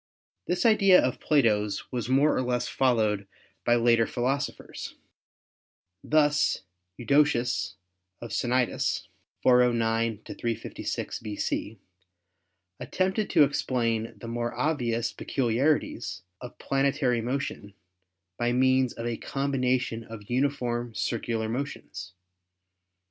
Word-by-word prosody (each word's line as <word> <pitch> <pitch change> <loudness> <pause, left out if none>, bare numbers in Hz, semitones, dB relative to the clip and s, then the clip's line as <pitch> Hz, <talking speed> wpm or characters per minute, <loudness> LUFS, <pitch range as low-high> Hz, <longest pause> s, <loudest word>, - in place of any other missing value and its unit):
This 180 +3 0
idea 195 -4 +6
of 125 - 0
Plato's 105 -9 +1
was 125 -1 -3
more 140 +4 +4
or - - +1
less 125 -1 -1
followed 110 -6 +1 0.4
by 120 - +4
later 115 -1 +3
philosophers. 130 +3 -3 1.1
Thus 150 -7 +2 0.3
Eudoxus 120 -8 +2 0.4
of 115 - -8
Cnidus 125 +2 0 0.4
(409 115 -3 +3
356 115 -2 -4
B.C.) 105 0 -3 1.0
at - - -8
tempted 190 +3 0
to - - +6
explain 115 -5 0
the 115 - -9
more 120 0 -3
obvious 120 -7 0
peculiarities 120 -6 0 0.2
of 125 - -9
plane 135 0 +1
tary 125 -3 0
motion 120 -5 -4 0.6
by 120 0 +1
means 130 0 +3
of 115 - -6
a 120 -1 -2
combination 130 -4 -1
of 110 -1 -10
uniform 120 -3 -1
circu 115 0 -2
lar 110 0 -2
motions. 110 -7 -5
120 Hz, 105 wpm, -27 LUFS, 115-135 Hz, 1.1 s, idea